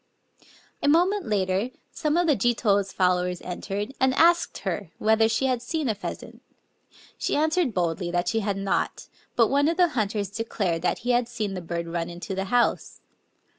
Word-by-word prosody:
A - - 0
moment 360 +6 +3
later 195 +1 0 0.2
some 305 +1 0
of 350 - +3
the 305 -4 +4
Jito's 205 -4 +1
followers 180 -1 +1
entered, 200 +6 -4
and 260 0 +3
asked 340 +2 +4
her 200 -5 -3
whether 220 +1 +3
she 225 +4 0
had 255 -2 +1
seen 305 +3 -2
a 220 - +2
pheasant. 200 - -8 0.8
She - - 0
answered 315 - +1
boldly 175 0 -1
that 175 0 -1
she 225 +4 +1
had 200 -2 -1
not; 195 0 -1 0.3
but 230 -3 +4
one 285 +2 +3
of 330 - 0
the 355 -2 +4
hunters 210 -6 -2
declared 200 -6 -2
that - - 0
he 250 - +2
had 240 -1 +1
seen 215 -4 -3
the 185 - -4
bird 170 0 -4
run 170 0 -3
into 175 +3 -6
the 190 0 -2
house. 240 +4 0
215 Hz, 180 wpm, -25 LUFS, 190-265 Hz, 0.8 s, the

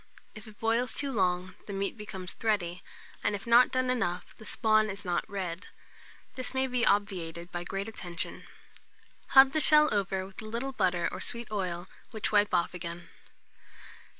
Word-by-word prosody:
If 215 +1 -11
it 210 -1 -14
boils 230 +2 +1
too 280 -1 -1
long, 185 -4 0
the 200 - -5
meat 195 0 -2
becomes 195 -4 -6
thready, 185 -6 -1 0.4
and 205 -1 +1
if 200 - -8
not 235 +2 +6
done 255 0 +1
enough, 180 -8 -2
the 220 - -13
spawn 215 -1 +2
is 200 0 -6
not 175 -1 -1
red: 185 -2 -4 0.7
this 255 0 -6
must 260 0 +1
be 250 -2 +1
obviated 180 -5 0
by 175 0 -4
great 195 +3 -4
attention. 180 -5 -5 0.8
Hub 265 0 +8
the 310 - +1
shell 300 -2 +6
over 195 -2 -1
with 195 +2 -10
a - - -9
little 235 +5 -3
butter 180 -6 +1
or - - -6
sweet 235 -2 0
oil, 180 -3 -3 0.2
which 220 -2 -2
wipe 205 -1 +3
off 170 - +1
again. 170 -1 -7
205 Hz, 175 wpm, -29 LUFS, 180-235 Hz, 0.8 s, Hub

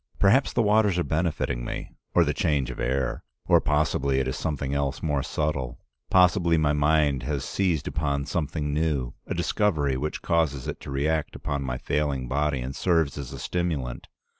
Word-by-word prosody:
Perhaps 115 +8 +4
the 120 - +2
waters 105 -3 +3
are 90 - +2
benefiting 75 -8 -1
me, - - -5 0.2
or 85 - +6
the 75 -2 0
change 70 -4 0
of - - -9
air. 65 +1 -1 0.2
Or - - +5
possibly 70 -2 +1
it 65 - 0
is 65 - -2
something 70 -3 -2
else 70 -1 -1
more 75 -3 +1
subtle. 70 -3 -2 0.3
Possibly 90 -2 +4
my 75 -2 +2
mind 75 -2 +2
has 75 -3 -2
seized 90 -7 0
upon 70 -2 -1
something 75 -2 -2
new, 75 -5 0
a - - -2
discovery 75 -10 +1
which 75 +4 -3
causes 75 -6 +1
it - - -4
to - - -9
react 75 +3 -1
upon 70 -1 -3
my 60 -2 -3
failing 70 -2 -1
body 70 +1 0
and 65 +2 -5
serves 80 -6 +1
as 70 -4 -6
a - - -7
stimulant. 80 -9 -3
75 Hz, 180 wpm, -26 LUFS, 70-80 Hz, 0.3 s, or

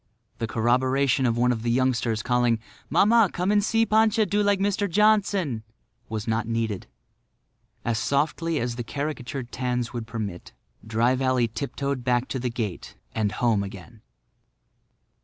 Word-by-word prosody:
The 115 - -1
corroboration 130 +3 +2
of 115 0 0
one 125 +1 +3
of 115 -2 -2
the 120 - -1
youngsters 120 -3 +1
calling, 120 -2 +2 0.3
"Mamma, 220 0 +5
come 180 +3 0
and 205 -1 +3
see 225 +2 +2
Pancha 220 0 +3
do 205 +1 +1
like 205 -1 +2
Mr. 200 0 0
Johnson," 200 - +2 0.5
was 110 -1 -4
not 110 0 0
needed. 115 -4 -2 1.0
As 115 -1 0
softly 155 +5 0
as 120 0 -2
the 120 - -3
caricatured 135 -2 -4
tans 125 -1 -2
would 115 -2 -5
permit, 105 -6 -6 0.3
Dry 115 +3 +2
Valley 130 -2 +1
tiptoed 140 +2 -3
back 125 0 +1
to 130 - -2
the 125 0 -1
gate 110 -6 -5 0.2
and 105 -2 0
home 115 -3 +2
again. 100 +3 -9
125 Hz, 150 wpm, -25 LUFS, 115-160 Hz, 1.0 s, Mamma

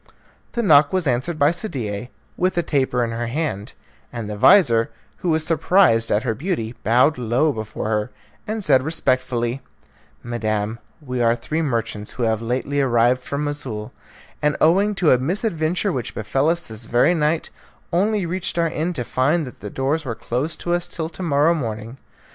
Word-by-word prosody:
The 235 - -1
knock 150 -6 +6
was 185 -2 0
answered 135 +5 0
by 145 +1 +4
Sadie, 125 - -4 0.3
with 185 0 0
a 175 - +2
taper 130 -5 +1
in 115 - -2
her 115 +1 -3
hand, 125 -6 -3 0.4
and 115 -3 -5
the 105 - -4
vizir, 115 - +5 0.3
who 180 - -2
was 160 -1 +1
surprised 160 -8 +3
at 105 +3 +2
her 120 -4 0
beauty, 125 - -3
bowed 125 +6 +3
low 125 +6 +2
before 110 -1 -5
her, 105 +1 -1 0.4
and 215 0 -3
said 135 -6 +4
respectfully, 130 -4 0 0.6
"Madam, 110 -2 -2 0.2
we 125 -3 -3
are 115 0 +3
three 155 +6 -3
merchants 115 -7 -2
who 125 - -3
have 110 -1 +1
lately 130 +4 -1
arrived 125 -1 +3
from 140 +3 -3
Moussoul, 135 -8 -4 0.5
and, 150 0 +1
owing 195 +6 +3
to 180 -5 +3
a 125 - +5
misadventure 175 - -1
which 125 -7 -4
befel 135 +7 0
us 170 +1 -1
this 110 0 -9
very 120 +9 +3
night, 155 0 0 0.4
only 200 +2 +1
reached 175 +1 -3
our 165 -1 +2
inn 165 +4 -2
to 130 -7 -3
find 145 +7 +1
that 125 - -11
the 105 - -7
doors 140 +7 -1
were 120 -5 -4
closed 145 +9 -3
to 175 - -1
us 175 0 0
till 160 -2 -4
to 170 - -10
morrow 155 -1 +3
morning. 115 -4 -4
135 Hz, 180 wpm, -21 LUFS, 115-165 Hz, 0.6 s, knock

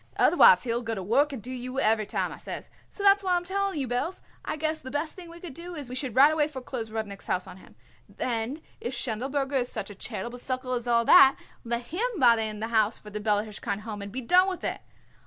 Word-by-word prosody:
'Otherwise - - +6
he 240 - -2
will 235 +1 0
go 225 -1 -3
to 190 - -5
work 280 +10 +2
and 255 -7 -7
do 255 - -6
you 255 +1 -4
every 215 -3 +2
time,' - - -1
I - - -10
says. - - -8 0.2
So 405 - -8
that's 400 0 +6
why 370 -1 +1
I - - +4
am 350 - -3
telling 390 -1 -1
you, 270 - -2
Belz, 250 +10 -2 0.2
I - - -3
guess 315 +1 -1
the 260 - -9
best 295 +3 -2
thing 355 -2 -11
we 340 +1 -11
could 345 -5 -8
do 345 +4 -8
is 285 -5 -5
we - - -6
should 255 -3 -3
right 285 +4 +7
away 300 -2 +2
foreclose 255 -5 -6
Rudnik's 215 -2 -5
house 180 0 0
on - - -11
him. - - -17 0.3
Then 245 +5 -3 0.2
if 245 +2 -4
Schindelberger 270 +4 -1
is 245 0 -1
such 210 -2 -4
a - - -8
charitable 240 +6 -5
sucker 255 0 -3
as 245 -1 -3
all 235 -1 +3
that, 270 +2 +8 0.3
let 235 +1 -2
him 405 - -3
buy 240 -3 +6
in 215 -1 -4
the 225 - -2
house 220 -1 +2
for 210 - -12
the 210 - -4
Bella 210 0 +1
Hirshkind 210 -1 -4
Home 210 -2 -6
and 200 0 -7
be 260 +4 -4
done 360 +9 +4
with 370 - -6
it. - - -3
255 Hz, 260 wpm, -27 LUFS, 225-305 Hz, 0.3 s, that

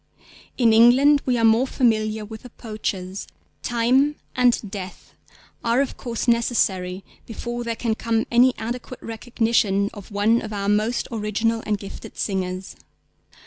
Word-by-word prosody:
In 230 -3 +4
England 260 +6 +6
we 250 -1 +2
are 230 - +3
more 225 +4 +4
familiar 215 -4 +1
with 220 +1 -9
the 250 - -11
poachers. 200 -4 -5 0.3
Time 255 +5 +2 0.2
and 250 -1 +4
Death 190 -3 -8 0.5
are 235 +2 +2
of 275 - 0
course 235 0 -4
necessary 195 -6 +1 0.2
before 240 +1 -5
there 230 -1 -2
can 225 -1 -1
come 225 0 -1
any 245 +2 +5
adequate 245 +2 -6
recognition 225 -3 0
of 205 -2 -11
one 215 +3 +2
of 215 -1 -6
our 200 -1 -2
most 215 +3 +1
original 225 +1 -1
and 210 -1 +1
gifted 200 0 -10
singers. 185 -1 -3
225 Hz, 145 wpm, -23 LUFS, 210-240 Hz, 0.5 s, England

